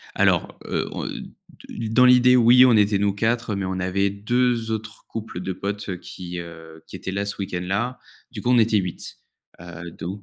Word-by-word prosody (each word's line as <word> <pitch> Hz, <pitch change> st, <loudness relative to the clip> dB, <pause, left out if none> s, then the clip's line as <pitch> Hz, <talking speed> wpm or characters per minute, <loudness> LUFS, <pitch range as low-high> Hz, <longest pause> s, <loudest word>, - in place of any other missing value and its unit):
Alors, -, -, +1 dB
heu, -, -, -2 dB
on, -, -, -4 dB
heu, -, -, -4 dB, 0.6 s
de 115 Hz, -1 st, -5 dB
dans 125 Hz, +2 st, +5 dB
l'idée, 125 Hz, 0 st, +6 dB
oui 125 Hz, +2 st, +7 dB
on 125 Hz, -2 st, +5 dB
était 105 Hz, -1 st, +3 dB
nous 100 Hz, 0 st, +1 dB
4 115 Hz, +1 st, 0 dB
mais 100 Hz, -1 st, -3 dB
on 95 Hz, 0 st, -3 dB
avait 95 Hz, +2 st, +1 dB
2 115 Hz, +3 st, 0 dB
autres 110 Hz, -1 st, -5 dB
couples 110 Hz, -5 st, -6 dB
de 95 Hz, +1 st, -3 dB
potes, 100 Hz, +3 st, -5 dB
heu, 90 Hz, -, -3 dB
qui, 90 Hz, 0 st, -8 dB
heu, 80 Hz, -1 st, -11 dB
qui -, -, -9 dB
étaient 95 Hz, -, -6 dB
là 100 Hz, +1 st, -2 dB
ce 100 Hz, -, -4 dB
week-end 95 Hz, -3 st, -3 dB
là. 105 Hz, +8 st, -2 dB, 0.3 s
Du -, -, -7 dB
coup 125 Hz, -, 0 dB
on 125 Hz, -, +5 dB
était 110 Hz, -2 st, +4 dB
8. 90 Hz, -3 st, -5 dB, 0.4 s
Heu, 85 Hz, 0 st, -9 dB
donc 95 Hz, +6 st, -7 dB
100 Hz, 210 wpm, -23 LUFS, 95-115 Hz, 0.6 s, oui